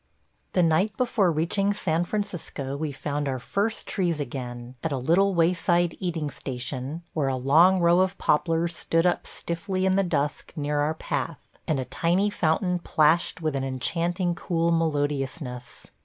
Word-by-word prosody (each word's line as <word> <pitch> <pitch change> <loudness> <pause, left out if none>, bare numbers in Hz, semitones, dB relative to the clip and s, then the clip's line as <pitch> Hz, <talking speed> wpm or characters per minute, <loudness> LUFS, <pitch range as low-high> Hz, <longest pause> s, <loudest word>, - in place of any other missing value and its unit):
The 180 - +3
night 170 +6 +2
before 220 -7 +2
reaching 195 +6 0
San 170 -3 0
Francisco 175 -9 -3
we 150 +1 -3
found 145 +1 -3
our 130 -1 -1
first 200 - -2
trees 175 -5 -1
again, 125 -3 -5
at 160 - -1
a 140 - 0
little 180 +9 +3
wayside 170 0 +2
eating 165 -5 -2
station, 130 +4 -5
where 150 -4 0
a 135 - 0
long 160 +9 +5
row 170 +1 +4
of 190 0 +1
poplars 165 +2 +1
stood 165 0 +1
up 175 - +1
stiffly 185 +3 -3
in 190 0 +3
the - - +4
dusk 145 -5 -2
near 145 -1 -1
our 150 +2 +1
path, - - -4 0.2
and 150 -4 +1
a 130 - -2
tiny 185 +8 +1
fountain 180 +1 +1
plashed 160 +1 +2
with 155 -3 0
an 135 - -1
enchanting, 170 +7 -1
cool 170 0 0
melodiousness. 145 -5 -2
165 Hz, 160 wpm, -26 LUFS, 145-180 Hz, 0.2 s, long